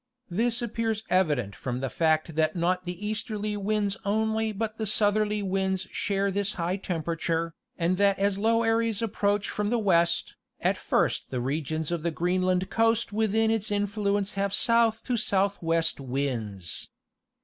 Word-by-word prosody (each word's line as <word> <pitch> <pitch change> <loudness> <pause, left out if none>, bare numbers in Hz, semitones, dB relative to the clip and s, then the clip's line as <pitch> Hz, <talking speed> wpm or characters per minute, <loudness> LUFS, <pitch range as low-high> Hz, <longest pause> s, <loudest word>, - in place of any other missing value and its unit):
This 235 +6 +1
appears 225 -2 -1
evident 145 - +2
from 125 +3 -4
the 135 0 -2
fact 160 0 +1
that 155 +2 +1
not 180 +1 0
the 180 +3 -5
easterly 210 -1 -2
winds 205 0 0
only 220 +1 +1
but 220 +1 -4
the 220 - -1
southerly 210 0 +2
winds 190 -1 -1
share 200 0 0
this 200 +1 -1
high 175 +2 -1
tem 175 -4 -3
perature, 165 0 -1 0.3
and 175 +1 +1
that 200 0 +3
as 200 0 +1
low 230 +2 +3
areas 225 -1 +1
approach 205 -2 0
from 210 0 -1
the 240 - +2
west, 170 -6 +2 0.3
at - - +2
first - - 0
the 125 - -2
regions 155 +4 -2
of 170 -2 -1
the 170 - 0
Greenland 180 +2 +1
coast 225 -1 +2
within 220 +1 +2
its 220 -1 -1
influence 205 0 0
have 195 0 0
south 230 -1 +3
to 250 -2 -1
southwest 190 -7 +1
winds. 120 -9 -3
200 Hz, 160 wpm, -27 LUFS, 170-215 Hz, 0.3 s, that